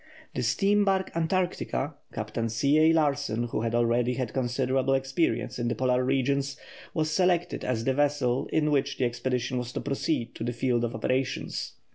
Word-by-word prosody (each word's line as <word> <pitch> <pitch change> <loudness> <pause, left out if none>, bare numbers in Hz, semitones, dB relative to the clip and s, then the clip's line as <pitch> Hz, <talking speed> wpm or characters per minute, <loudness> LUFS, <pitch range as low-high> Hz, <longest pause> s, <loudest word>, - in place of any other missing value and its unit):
The - - -2
steam 205 +1 +3
barque 190 -3 0
Antarctica, 165 -4 -1 0.2
Captain 115 +1 -3
C. 140 +7 +2
A. 160 +1 +6
Larsen, 145 -7 +1
who 110 - -2
had 115 0 -1
already 120 +1 +2
had 125 -4 -3
considerable 130 +1 +1
experience 135 -2 -1
in 120 - 0
the 120 - 0
Polar 130 -1 +2
regions, 135 +1 0 0.4
was 155 -1 0
selected 175 0 +1
as 115 -3 -1
the 130 - +1
vessel 140 -2 +1
in 150 -1 +2
which 140 -1 +1
the 130 - +1
expedition 125 +1 -1
was 125 0 -5
to - - -2
proceed 140 -3 -1
to - - -6
the 120 +1 -2
field 120 0 0
of 120 +1 -2
operations. 130 0 -2
130 Hz, 175 wpm, -27 LUFS, 120-150 Hz, 0.4 s, A